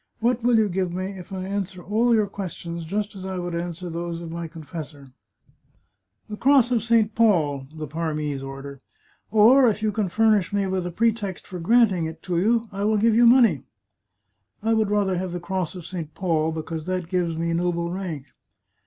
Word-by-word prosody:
What 240 +1 +1
will 240 0 +3
you 220 -1 +4
give 185 -1 -1
me 185 +2 -3
if 185 -2 -10
I 190 -1 -4
answer 190 -2 -4
all 230 +4 +2
your 215 -1 +3
questions 170 -4 -6
just 205 +4 -3
as 190 - -8
I 190 -1 -4
would 175 -1 -4
answer 175 +1 -4
those 170 0 -4
of 170 -1 -7
my 170 0 -5
confessor? 155 -4 -9 0.4
" - - -41
" 95 +2 -51
The 210 - -7
Cross 265 -1 +4
of 235 -3 +2
St. 225 -1 +2
Paul 155 -13 +2
" 155 - -19
(the 155 - -4
Parmese 150 -2 -3
order), 135 0 -8 0.3
" - - -37
or, 235 +4 +6
if 215 0 -3
you 215 - +2
can 205 -2 -1
furnish 215 -1 +3
me 200 -1 0
with 185 -2 -2
a - - -5
pretext 215 -1 -1
for 180 - -7
granting 195 -3 +3
it 160 0 -9
to 175 -2 -1
you, 225 +4 +2
I 200 0 -4
will 215 +1 +2
give 225 +2 +3
you 235 +2 +6
money." 230 - +5 0.5
" 100 - -41
I 225 +1 +2
would 220 -2 +2
rather 200 -3 +1
have 185 -1 -4
the 175 - -3
Cross 185 -1 -3
of 175 -3 -8
St. 170 -4 -6
Paul, 160 -4 0
because 160 0 -5
that 185 -2 -2
gives 175 -2 -1
me 170 0 -1
noble 170 0 -1
rank." 175 -7 -5
185 Hz, 215 wpm, -24 LUFS, 165-210 Hz, 0.5 s, or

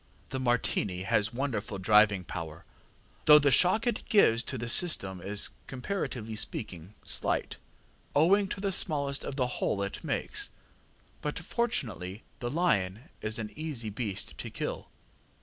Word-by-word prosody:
The 130 - -3
Martini 115 -7 0
has 105 +2 +1
wonderful 120 -6 -3
driving 105 0 +4
power, 80 -3 -7 0.6
though 150 0 +10
the 145 -2 +4
shock 185 - +5
it 240 - 0
gives 115 - +5
to 130 - -2
the 120 0 -4
system 100 - +2
is, 100 +2 +1 0.2
comparatively 130 - -4
speaking, 95 -3 -4
slight, - - -1 0.6
owing 195 +7 +5
to 190 - -5
the 200 0 -1
smallness 140 -6 -1
of 135 - -5
the 130 -3 +1 0.2
hole 100 - +1
it 100 - -5
makes. - - -2 0.7
But 150 - -3
fortunately 115 - -2 0.2
the 120 -2 -3
lion 120 - 0
is 110 0 0
an 110 -2 -4
easy 145 -9 -2
beast 105 -2 -3
to - - -4
kill. - - -5
120 Hz, 145 wpm, -30 LUFS, 100-150 Hz, 0.7 s, though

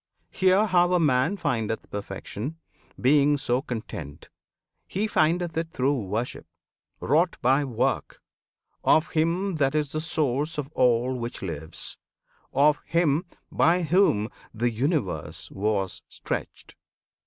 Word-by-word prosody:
Hear 190 +3 +4
how 180 -3 +3
a 180 - +4
man 150 +4 +2
Findeth 115 - -2
perfection, 100 +8 -5 0.4
being 145 +2 +4
so 125 -1 0
content: 105 - -7 0.6
He 200 +3 -1
findeth 170 -3 +1
it 165 0 -1
through 135 +1 +1
worship 110 +5 -3 0.5
wrought 170 +3 +2
by 135 +4 +4
work 125 -5 -1 0.6
Of 160 +2 +4
Him 170 +3 0
that 140 -1 +1
is 150 -2 0
the 155 - -2
Source 155 -1 -1
of 145 -1 -4
all 125 0 +3
which 120 -2 -5
lives, 80 -4 -6 0.5
Of 145 +1 +3
HIM 165 0 +2 0.3
by 175 +2 +3
Whom 160 - +3 0.2
the 120 +2 0
universe 95 - -2
was 100 -1 -1
stretched. - - -5
140 Hz, 120 wpm, -26 LUFS, 115-165 Hz, 0.6 s, Hear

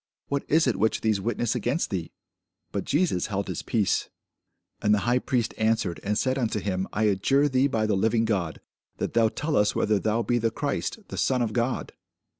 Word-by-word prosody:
what 140 0 -1
is 160 +2 +4
it 125 -6 +1
which 110 +3 +1
these 110 -3 +1
witness 120 +1 -1
against 135 +5 -1
thee? 90 -4 -3 0.6
But - - -3
Jesus 150 - +1
held 100 -1 -2
his - - -3
peace. 105 -5 0 0.7
And 105 0 +4
the 100 - -1
high 120 +1 +3
priest 120 -3 -1
answered 110 -7 +1
and 105 +1 0
said 130 +2 +1
unto 110 -3 0
him, 95 -2 -2
I 110 - -1
adjure 110 +8 +3
thee 130 0 +3
by 110 -6 0
the 105 -2 +1
living 110 +3 +2
God, 95 -8 -1 0.4
that - - -3
thou 115 -1 +4
tell 150 +7 -2
us 105 0 +3
whether 105 -1 +2
thou 110 +4 0
be 120 +1 +1
the 115 0 +1
Christ, 140 - -2
the - - -5
Son 130 -2 +2
of 110 -2 -2
God. 120 +1 -1
110 Hz, 205 wpm, -26 LUFS, 105-125 Hz, 0.7 s, is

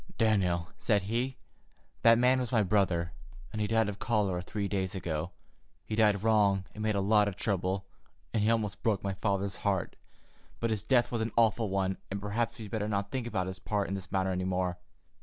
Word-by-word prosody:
"Daniel," 95 -6 +2
said 105 -4 +2
he, 120 +6 -1 0.6
"that 115 0 +7
man 125 +2 +4
was 125 -2 -3
my 115 -4 +3
brother, 90 -4 +1 0.4
and 110 - -3
he 105 - +1
died 110 0 +2
of 100 -1 -5
cholera 100 -6 0
three 100 +2 -3
days 95 -1 -2
ago. 85 -3 -3 0.6
He - - -5
did 105 -3 +3
wrong 100 -4 +3
and 110 - -7
made 110 -1 +1
a - - +2
lot 105 +1 +4
of 100 - -3
trouble, 95 -2 -1 0.5
and 110 - +1
he 105 - +3
almost 105 -3 0
broke 105 -4 +1
my 100 -1 -1
father's 100 0 -1
heart, 95 -3 -1 0.6
but 115 -1 0
his 110 -2 -1
death 120 +1 +3
was 120 -2 -1
an 110 0 -1
awful 115 -1 +3
one, 95 0 0
and 100 - -3
perhaps 105 +3 -2
we'd 110 -3 -8
better 105 -2 -1
not 100 -1 -1
think 130 -3 -2
about 95 -6 -1
his 95 0 -6
part 105 -2 -1
in - - -2
this 95 -1 -5
matter 95 -1 +1
any 90 0 -1
more. 90 -1 -1
100 Hz, 210 wpm, -30 LUFS, 95-110 Hz, 0.6 s, that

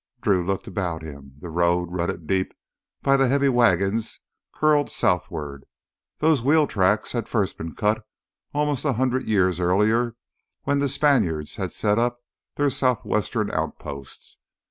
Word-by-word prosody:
Drew 100 -6 +2
looked 95 +2 -2
about 85 -5 -3
him. 70 -3 -10
The 85 - -7
road, 85 +1 +1
rutted 85 -2 -3
deep 95 +3 -1 0.5
by 135 0 +4
the 135 -1 +3
heavy 140 +2 +3
wagons, 110 -3 +2 0.3
curled 150 -1 +2
southward. 75 -6 -1 0.5
Those 155 -4 +3
wheel 150 +4 +4
tracks 105 -2 +1
had 120 -2 -3
first 105 -5 0
been 80 0 -7
cut 105 +1 0 0.5
almost 145 -2 0
a 145 -3 +1
hundred 130 +2 0
years 95 -5 +2
earlier 110 +6 +2 0.5
when 140 0 +1
the 140 0 +1
Spaniards 125 - +1
had - - -3
set 105 +2 +1
up 120 +1 0 0.4
their 145 -1 +1
southwestern 125 -4 0
outposts. 70 -1 -6
105 Hz, 145 wpm, -24 LUFS, 90-130 Hz, 0.5 s, by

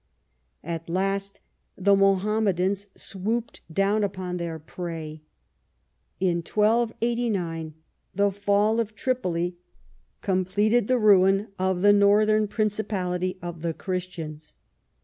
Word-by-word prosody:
At 165 0 -5
last 195 +2 -2 0.4
the 200 +1 +4
Mohammedans 195 0 +1
swooped 220 +5 -3
down 200 +5 +2
upon 185 -2 -3
their 170 -2 -4
prey. 160 -1 -7 1.0
In 180 -2 +1
1289 215 -5 0 0.4
the 200 +1 +3
fall 205 +3 +2
of 220 -2 -2
Tripoli 180 -8 -1 0.6
completed 200 +4 +1
the 255 - +3
ruin 195 -1 +4
of 185 -1 0
the 205 0 +7
northern 210 +1 +4
principality 195 -4 -1
of 175 -2 -6
the 165 -1 -2
Christians. 170 -5 -6
195 Hz, 100 wpm, -25 LUFS, 175-210 Hz, 1.0 s, the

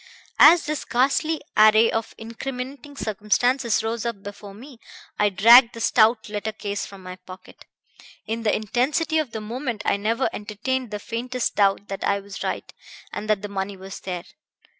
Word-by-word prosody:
"As 330 +3 +8
this 300 -1 -3
ghastly 280 +5 0
array 215 +1 +6
of 225 -1 -3
incriminating 265 +5 -7
circumstances 220 +3 0
rose 225 0 -2
up 235 -5 -4
before 205 0 -10
me, 250 +2 -13 0.4
I 210 - +4
dragged 230 +5 +7
the - - -7
stout 225 0 +3
letter 210 +1 -4
case 205 -1 -4
from 195 -1 -13
my 185 0 -8
pocket. 185 0 -14 0.6
In 225 +1 -3
the 220 -2 +1
intensity 280 - 0
of 305 -5 -2
the 220 - -5
moment 235 0 -4
I - - +2
never 225 +5 0
entertained 230 +5 -3
the 210 - -4
faintest 240 +3 -3
doubt 200 0 +2
that 195 - -5
I 200 0 +1
was 200 0 -10
right, - - -4 0.4
and 210 +1 -5
that 210 -2 +1
the - - -3
money 195 0 -4
was 190 +1 -9
there. 180 -2 -6
220 Hz, 170 wpm, -23 LUFS, 205-250 Hz, 0.6 s, As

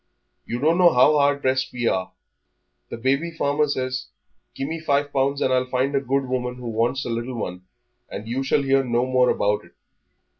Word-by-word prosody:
You 120 - -2
don't 160 +7 +2
know 175 -2 +7
how 145 +4 +5
hard 140 0 +2
pressed 130 0 0
we 120 -1 -3
are. 95 -3 -1 0.8
The - - -6
baby 135 +7 0
farmer 150 -2 0
says, 130 -2 -3 0.5
'Give 135 - -3
me 165 +2 -4
five 145 -2 0
pounds 140 +1 +1
and 130 - +1
I'll 130 0 +1
find 130 +2 0
a 135 - +2
good 135 +1 0
woman 125 -1 -2
who 125 -1 -7
wants 115 +4 0
a - - -4
little 120 +2 -3
one, 90 -4 -6 0.4
and 105 +2 -7
you 125 +3 -2
shall 140 +1 +1
hear 135 0 +3
no 120 0 0
more 130 -1 +3
about 105 +1 +1
it.' - - -20
130 Hz, 200 wpm, -23 LUFS, 125-140 Hz, 0.8 s, know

